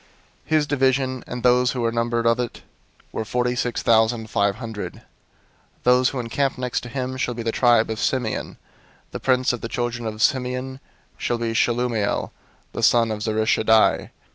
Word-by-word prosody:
002:011 -, -, -30 dB, 0.4 s
His 155 Hz, -1 st, +3 dB
division, 130 Hz, -2 st, +1 dB
and 125 Hz, -1 st, -6 dB
those 125 Hz, +1 st, +4 dB
who 125 Hz, -, -3 dB
were 115 Hz, 0 st, +1 dB
numbered 115 Hz, 0 st, -1 dB
of 115 Hz, +1 st, +3 dB
it, 120 Hz, -1 st, -4 dB, 0.5 s
were -, -, -3 dB
forty 125 Hz, +2 st, -1 dB
six 120 Hz, -1 st, -2 dB
thousand 110 Hz, 0 st, +2 dB
five 100 Hz, -2 st, +1 dB
hundred. 110 Hz, -3 st, -6 dB
002:012 -, -, -16 dB, 0.8 s
"Those 125 Hz, +1 st, +4 dB
who 135 Hz, -, -4 dB
encamp 130 Hz, +3 st, -1 dB
next 125 Hz, -1 st, -2 dB
to 120 Hz, -, -9 dB
him 130 Hz, 0 st, -4 dB
shall 125 Hz, -1 st, -2 dB
be 115 Hz, -, -5 dB
the 115 Hz, -, 0 dB
tribe 120 Hz, -2 st, +3 dB
of 110 Hz, -, -4 dB
Simeon. 125 Hz, -5 st, -2 dB, 0.5 s
The -, -, -5 dB
prince 130 Hz, -1 st, +2 dB
of 120 Hz, -, -5 dB
the 115 Hz, -, -5 dB
children 120 Hz, -1 st, -3 dB
of 110 Hz, 0 st, -5 dB
Simeon 130 Hz, +2 st, 0 dB, 0.4 s
shall 120 Hz, -, -1 dB
be 115 Hz, -1 st, -2 dB
Shelumiel 115 Hz, -2 st, 0 dB, 0.4 s
the -, -, -5 dB
son 115 Hz, 0 st, +4 dB
of 105 Hz, -, -3 dB
Zurishaddai. 110 Hz, 0 st, +2 dB
120 Hz, 180 wpm, -23 LUFS, 115-125 Hz, 0.8 s, those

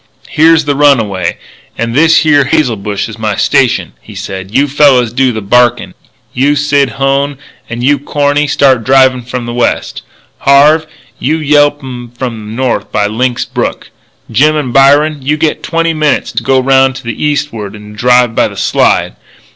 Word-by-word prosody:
"Here's 160 Hz, 0 st, +3 dB
the 145 Hz, -, 0 dB
runway 110 Hz, -12 st, +1 dB, 0.4 s
and 115 Hz, 0 st, -3 dB
this 160 Hz, +5 st, +4 dB
here 145 Hz, -3 st, +3 dB
hazel 150 Hz, -6 st, 0 dB
bush 100 Hz, 0 st, -4 dB
is 115 Hz, 0 st, -11 dB
my 110 Hz, -2 st, -2 dB
station," -, -, 0 dB
he -, -, -14 dB
said. 95 Hz, 0 st, -7 dB
"You 140 Hz, +7 st, +1 dB
fellas 135 Hz, -5 st, +2 dB
do 130 Hz, 0 st, +1 dB
the 110 Hz, -3 st, -5 dB
barkin'. 120 Hz, +4 st, +1 dB, 0.4 s
You, 140 Hz, +3 st, +1 dB
Sid 145 Hz, -3 st, 0 dB
Hone, 135 Hz, +1 st, 0 dB, 0.3 s
and 115 Hz, +1 st, -5 dB
you, 140 Hz, +2 st, +2 dB
Corny, 145 Hz, +1 st, 0 dB
start 135 Hz, -4 st, +2 dB
drivin' 130 Hz, 0 st, +3 dB
from 125 Hz, 0 st, -6 dB
the 120 Hz, -, -5 dB
west. 120 Hz, 0 st, -2 dB, 0.4 s
Harve, 150 Hz, +3 st, +3 dB, 0.3 s
you 155 Hz, +4 st, -1 dB
yelp 145 Hz, -1 st, +1 dB
'em 120 Hz, -2 st, -8 dB
from 120 Hz, -3 st, -4 dB
the 110 Hz, -, -8 dB
north 120 Hz, -5 st, -2 dB
by 105 Hz, -, 0 dB
Lynx 120 Hz, +4 st, -2 dB
Brook. -, -, -4 dB, 0.4 s
Jim 150 Hz, +7 st, +2 dB
and 135 Hz, -5 st, -3 dB
Byron, 145 Hz, +3 st, +3 dB
you 145 Hz, +3 st, -1 dB
get 155 Hz, 0 st, -1 dB
twenty 165 Hz, 0 st, -1 dB
minutes 155 Hz, -2 st, -1 dB
to 115 Hz, -, -3 dB
go 130 Hz, +3 st, +1 dB
'round 135 Hz, 0 st, +2 dB
to -, -, -9 dB
the 120 Hz, +2 st, -5 dB
eastward 130 Hz, -9 st, -3 dB
and 105 Hz, 0 st, -12 dB
drive 125 Hz, +1 st, +2 dB
by -, -, +1 dB
the -, -, -11 dB
Slide. -, -, 0 dB
130 Hz, 175 wpm, -10 LUFS, 115-145 Hz, 0.4 s, this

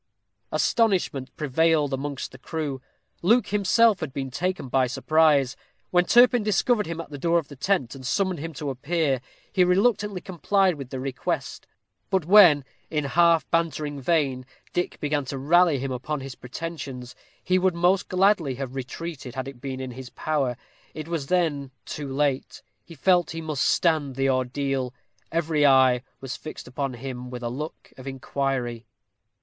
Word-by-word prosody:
Astonishment 185 Hz, -, +1 dB
prevailed 150 Hz, 0 st, +2 dB
amongst 140 Hz, +1 st, -4 dB
the 130 Hz, -, -13 dB
crew. 145 Hz, -3 st, -4 dB, 0.4 s
Luke 215 Hz, +4 st, +3 dB
himself 210 Hz, +2 st, +4 dB
had 155 Hz, -5 st, -4 dB
been 135 Hz, -1 st, -4 dB
taken 180 Hz, +1 st, -2 dB
by 130 Hz, 0 st, +2 dB
surprise. 145 Hz, 0 st, +3 dB, 0.4 s
When 180 Hz, 0 st, +4 dB
Turpin 245 Hz, +3 st, +6 dB
discovered 210 Hz, +1 st, +1 dB
him 165 Hz, 0 st, -5 dB
at 165 Hz, -, -7 dB
the 145 Hz, -, -7 dB
door 170 Hz, +3 st, +2 dB
of 160 Hz, -4 st, -2 dB
the 145 Hz, -, -10 dB
tent, 140 Hz, -, 0 dB
and 135 Hz, -2 st, -10 dB
summoned 185 Hz, +5 st, 0 dB
him 165 Hz, +3 st, -5 dB
to 145 Hz, 0 st, -4 dB
appear, 140 Hz, 0 st, 0 dB, 0.3 s
he 185 Hz, -, +4 dB
reluctantly 200 Hz, +1 st, +2 dB
complied 190 Hz, +1 st, +1 dB
with 140 Hz, -5 st, -8 dB
the 130 Hz, -, -5 dB
request; 130 Hz, 0 st, -3 dB, 0.4 s
but 190 Hz, -4 st, +1 dB
when, 175 Hz, -7 st, +7 dB, 0.2 s
in 150 Hz, -2 st, -1 dB
a -, -, -3 dB
half 170 Hz, 0 st, +4 dB
bantering 155 Hz, -4 st, -1 dB
vein, 135 Hz, -4 st, 0 dB, 0.3 s
Dick 175 Hz, -, -2 dB
began 145 Hz, -1 st, 0 dB
to 135 Hz, +1 st, -5 dB
rally 165 Hz, +3 st, +4 dB
him 135 Hz, +1 st, -3 dB
upon 135 Hz, +3 st, -3 dB
his 135 Hz, 0 st, -7 dB
pretensions, 125 Hz, -1 st, -7 dB, 0.3 s
he 185 Hz, +1 st, +2 dB
would 185 Hz, -1 st, +2 dB
most 180 Hz, +3 st, +2 dB
gladly 185 Hz, -7 st, +2 dB
have 130 Hz, -1 st, -5 dB
retreated, 135 Hz, 0 st, -6 dB
had 130 Hz, 0 st, -4 dB
it 135 Hz, -3 st, -10 dB
been 135 Hz, -2 st, -5 dB
in 130 Hz, -1 st, -5 dB
his 125 Hz, 0 st, -9 dB
power. 135 Hz, -6 st, -1 dB, 0.4 s
It 155 Hz, 0 st, -6 dB
was 165 Hz, -5 st, -3 dB
then 155 Hz, -6 st, 0 dB, 0.2 s
too 145 Hz, -2 st, -5 dB
late. 140 Hz, -1 st, -1 dB, 0.2 s
He 165 Hz, -, -13 dB
felt 175 Hz, +3 st, +3 dB
he 165 Hz, -, -5 dB
must 155 Hz, -4 st, -1 dB
stand 155 Hz, -6 st, +1 dB
the 135 Hz, 0 st, +2 dB
ordeal. 130 Hz, 0 st, -1 dB, 0.4 s
Every 160 Hz, -2 st, +1 dB
eye 130 Hz, -3 st, +5 dB, 0.2 s
was 135 Hz, -2 st, -5 dB
fixed 155 Hz, -, -9 dB
upon 130 Hz, +1 st, -3 dB
him 125 Hz, 0 st, -6 dB
with 125 Hz, -1 st, -7 dB
a 120 Hz, -, -1 dB
look 150 Hz, +6 st, -7 dB
of 130 Hz, +1 st, -10 dB
inquiry. 135 Hz, -3 st, -3 dB
145 Hz, 170 wpm, -25 LUFS, 130-170 Hz, 0.4 s, when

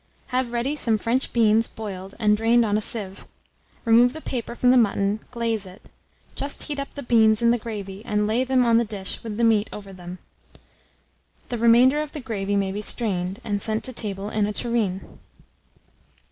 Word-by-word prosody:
Have 255 Hz, -1 st, -1 dB
ready 240 Hz, +5 st, -1 dB
some 230 Hz, -7 st, +2 dB
French 240 Hz, +5 st, -1 dB
beans, 225 Hz, -1 st, +3 dB
boiled, 195 Hz, -3 st, -8 dB
and 210 Hz, -1 st, +3 dB
drained 230 Hz, +2 st, +3 dB
on 205 Hz, -1 st, 0 dB
a 215 Hz, -, +1 dB
sieve; 205 Hz, -3 st, -1 dB, 0.6 s
remove 235 Hz, +2 st, +5 dB
the 315 Hz, -, -6 dB
paper 240 Hz, -4 st, -4 dB
from 250 Hz, 0 st, +3 dB
the -, -, +5 dB
mutton, 205 Hz, -3 st, +2 dB
glaze 230 Hz, -4 st, -2 dB
it; 185 Hz, +3 st, -15 dB, 0.4 s
just 280 Hz, +1 st, -3 dB
heat 290 Hz, -2 st, -4 dB
up 275 Hz, -, -5 dB
the 285 Hz, -, -6 dB
beans 220 Hz, -2 st, +4 dB
in 235 Hz, -, +5 dB
the 240 Hz, -, +1 dB
gravy, 205 Hz, -3 st, -7 dB
and 210 Hz, -3 st, 0 dB
lay 225 Hz, +4 st, +1 dB
them 260 Hz, -1 st, +2 dB
on 230 Hz, -1 st, +4 dB
the -, -, +2 dB
dish 205 Hz, -3 st, -6 dB
with 220 Hz, -2 st, -5 dB
the 235 Hz, -, 0 dB
meat 220 Hz, -2 st, +3 dB
over 200 Hz, -2 st, -9 dB
them. 180 Hz, 0 st, -9 dB, 1.3 s
The 240 Hz, -, -3 dB
remainder 245 Hz, +5 st, +5 dB
of 305 Hz, -1 st, -6 dB
the 305 Hz, -, -5 dB
gravy 205 Hz, -6 st, -3 dB
may 195 Hz, -1 st, 0 dB
be 205 Hz, +2 st, -4 dB
strained, 195 Hz, -3 st, -1 dB
and 205 Hz, -1 st, -2 dB
sent 220 Hz, -1 st, -1 dB
to 255 Hz, -, -1 dB
table 205 Hz, -2 st, -4 dB
in 210 Hz, -1 st, +1 dB
a 210 Hz, -, -3 dB
tureen. 215 Hz, -5 st, -2 dB
225 Hz, 195 wpm, -24 LUFS, 205-240 Hz, 1.3 s, remove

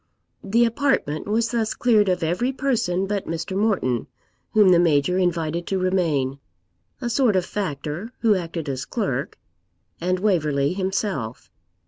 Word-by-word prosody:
The 230 Hz, +4 st, +3 dB
apartment 230 Hz, -, 0 dB
was 225 Hz, +2 st, +1 dB
thus 225 Hz, -2 st, -1 dB
cleared 215 Hz, -5 st, +3 dB
of 180 Hz, -2 st, 0 dB
every 180 Hz, +11 st, 0 dB
person 225 Hz, -10 st, 0 dB
but 200 Hz, 0 st, -3 dB
Mr. 165 Hz, +3 st, -4 dB
Morton, 190 Hz, -, 0 dB, 0.5 s
whom 210 Hz, -3 st, +6 dB
the 175 Hz, -2 st, +6 dB
Major 170 Hz, +2 st, +3 dB
invited 170 Hz, -2 st, -1 dB
to 195 Hz, -, 0 dB
remain; 165 Hz, -8 st, 0 dB, 0.6 s
a 250 Hz, -, -3 dB
sort 240 Hz, -3 st, +2 dB
of 185 Hz, -2 st, +2 dB
factor, 175 Hz, -, -4 dB
who 225 Hz, -2 st, +4 dB
acted 165 Hz, -4 st, -3 dB
as 135 Hz, -2 st, -3 dB
clerk; -, -, -3 dB, 0.6 s
and 185 Hz, +2 st, +1 dB
Waverley 155 Hz, -7 st, +1 dB
himself. 190 Hz, -, -3 dB
185 Hz, 140 wpm, -23 LUFS, 160-215 Hz, 0.6 s, whom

